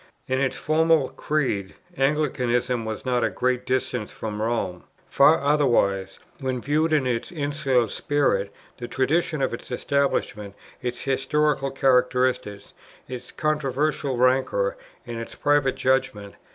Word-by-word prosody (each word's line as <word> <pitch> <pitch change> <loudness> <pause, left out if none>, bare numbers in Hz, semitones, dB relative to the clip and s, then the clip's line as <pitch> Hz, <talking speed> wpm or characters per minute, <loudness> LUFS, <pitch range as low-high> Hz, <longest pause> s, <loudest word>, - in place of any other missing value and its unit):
In 130 +1 0
its 135 - 0
formal 160 -2 +2
creed 130 -8 -2 0.2
Anglicanism 125 -5 0
was 110 +2 -5
not 125 -2 +1
at - - +3
a - - -15
great 125 0 0
distance 130 -4 -1
from 105 -1 -5
Rome: 110 -6 -2 0.2
far 145 +4 +5
otherwise, 120 -10 +2 0.2
when 130 -2 -2
viewed 155 +5 +1
in 150 -4 +2
its 120 -2 -2
insular 145 -6 0
spirit, 105 -6 0 0.3
the 120 - -5
traditions 150 +3 0
of 130 - 0
its 115 - -7
establishment, 125 -6 -1 0.3
its 125 0 -4
historical 135 +1 +1
characteristics, 125 -6 +1 0.3
its 125 -1 -8
controversial 150 -2 -1
rancour, 135 - +2 0.3
and 120 -1 -5
its 115 - -7
private 145 -2 +2
judgment. 130 -6 0
130 Hz, 130 wpm, -24 LUFS, 120-145 Hz, 0.3 s, far